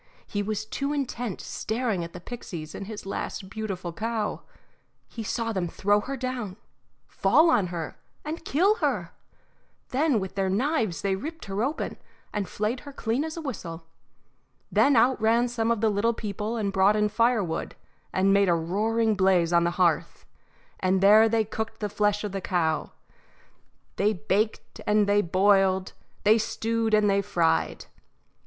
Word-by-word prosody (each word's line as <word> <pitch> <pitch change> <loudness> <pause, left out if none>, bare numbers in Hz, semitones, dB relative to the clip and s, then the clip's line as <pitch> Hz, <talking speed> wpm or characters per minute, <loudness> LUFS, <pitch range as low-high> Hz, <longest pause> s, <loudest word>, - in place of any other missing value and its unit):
He 205 - -2
was 210 +1 -3
too 275 +6 -2
intent 245 -7 -3
staring 220 -5 -2
at 170 - -7
the 180 - -9
pixies 170 -7 -7
and 195 - -7
his 215 -2 -7
last 195 0 -5
beautiful 190 -6 -4
cow. 220 +3 -2 0.7
He 230 - -7
saw 225 +1 -2
them 185 -3 -1
throw 205 +4 +2
her 275 +5 -5
down, 245 -7 -4 0.5
fall 330 +1 +4
on 200 - +3
her, 170 -2 -6 0.3
and 315 +3 -5
kill 390 +9 +2
her; - - -1 0.8
then 275 -2 +2
with 190 -1 -5
their 195 -1 0
knives 220 - 0
they 195 -1 +1
ripped 320 +11 -7
her 195 +1 -3
open, 280 +6 -2 0.4
and 205 -3 -2
flayed 215 +4 -2
her 285 - -11
as 280 - -13
clean 235 +4 -1
as 320 +1 -5
a 330 - -5
whistle. 170 - -6 0.9
Then 280 -1 +4
out 245 +1 +4
ran 230 +2 +3
some 230 -2 -1
of 230 -2 +1
the 220 - +3
little 215 +3 +1
people 210 +2 -4
and 200 -3 -1
brought 195 +2 +4
in 210 0 +2
firewood 215 -5 0 0.4
and 195 +1 +3
made 200 -1 +4
a 170 - +4
roaring 215 +7 +1
blaze 185 -3 +3
on 170 0 +4
the - - +3
hearth, 175 -4 +1 0.5
and 185 0 +1
there 215 +3 +7
they 225 -1 +2
cooked 220 +1 -5
the 210 - -2
flesh 210 0 +1
of 210 - -3
the 195 0 -4
cow 165 -4 0 1.1
they 210 +2 +2
baked 200 +6 -2
and 210 0 +4
they 205 0 +3
boiled, 190 +1 +3 0.3
they 215 +2 +5
stewed 225 0 0
and 210 -1 +3
they 200 0 +3
fried. 165 - 0
210 Hz, 170 wpm, -26 LUFS, 190-230 Hz, 1.1 s, there